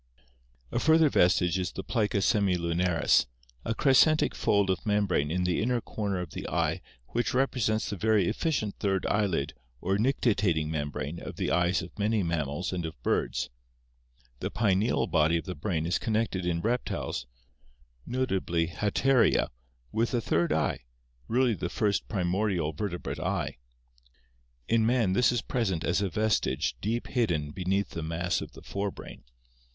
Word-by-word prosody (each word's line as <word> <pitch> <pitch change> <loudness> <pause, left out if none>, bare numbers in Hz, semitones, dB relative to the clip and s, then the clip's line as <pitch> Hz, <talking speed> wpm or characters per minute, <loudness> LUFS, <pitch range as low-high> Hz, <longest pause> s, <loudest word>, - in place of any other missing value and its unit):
A - - 0
further 160 -1 +5
vestige 90 -3 +3
is 90 - -2
the 95 - -6
plica 105 -4 0
semilunaris, 90 -4 +2 0.4
a 115 - -2
crescentic 145 +5 +4
fold 100 -2 +2
of 95 - -2
membrane 100 -8 +1
in 90 +3 0
the 90 -1 +1
inner 120 +2 +1
corner 100 -3 -3
of 90 -4 -5
the - - -6
eye - - 0 0.3
which 120 +2 -1
represents 125 -6 +1
the 100 - -3
very 105 -1 +3
efficient 110 - -1
third 95 -2 0
eyelid 100 -9 0 0.3
or 95 +6 0
nictitating 100 - +1
membrane 75 +1 -3
of - - -7
the - - -1
eyes 90 +1 +2
of 90 - -11
many 105 0 +1
mammals 85 +1 -2
and 90 -2 -2
of 80 -4 -6
birds. - - 0 0.9
The - - -2
pineal 105 +1 +1
body 80 0 +2
of 80 - -5
the 90 - -4
brain 80 0 -2
is 85 0 0
connected 110 -5 -1
in 85 -1 0
reptiles, 115 - -2 0.8
notably 95 - -1
Halkria, 115 +7 +2 0.4
with 115 +2 0
a - - +2
third 85 -4 +1
eye, 80 0 +1 0.5
really 125 0 +2
the - - -3
first 105 -2 0
pri 100 -5 -1
mordial 90 -4 0
vertebrate 90 0 -4
eye. - - -2 1.1
In 115 -1 +3
man 115 -4 +2
this 125 +5 +4
is 120 - -1
present 95 -10 -1
as 90 - +1
a 100 - 0
vestige 90 -7 0
deep 115 +4 -1
hidden 85 - 0
beneath 95 +2 -1
the 85 - -4
mass 85 +3 -1
of - - -8
the - - -13
fore 100 +1 -2
brain. - - -11
95 Hz, 155 wpm, -28 LUFS, 85-110 Hz, 1.1 s, further